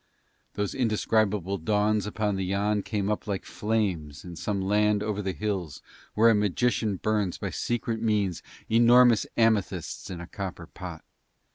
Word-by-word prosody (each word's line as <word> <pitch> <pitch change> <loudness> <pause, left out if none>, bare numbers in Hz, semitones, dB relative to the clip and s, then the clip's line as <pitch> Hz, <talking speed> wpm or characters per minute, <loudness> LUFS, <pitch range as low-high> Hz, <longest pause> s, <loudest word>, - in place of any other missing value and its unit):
Those 105 -1 -1
indescribable 105 -5 +1
dawns 105 +4 +1
upon 105 -1 -1
the 95 - -2
Yann 100 +2 0
came 100 -2 -2
up 105 - -3
like 100 -2 -3
flames 95 -10 -2
in 90 -1 -8
some 100 +4 -2
land 105 +2 +2
over 105 -1 -2
the 95 -1 -2
hills 90 -3 -4 0.3
where 115 +2 +6
a - - +4
magician 105 +1 +1
burns 105 -2 -1
by - - -4
secret 115 -1 -2
means 105 -6 0 0.3
enormous 120 0 +5
amethysts 105 -6 0
in 90 -3 -6
a 85 - -7
copper 95 -2 -6
pot. - - -9
105 Hz, 150 wpm, -27 LUFS, 95-110 Hz, 0.3 s, where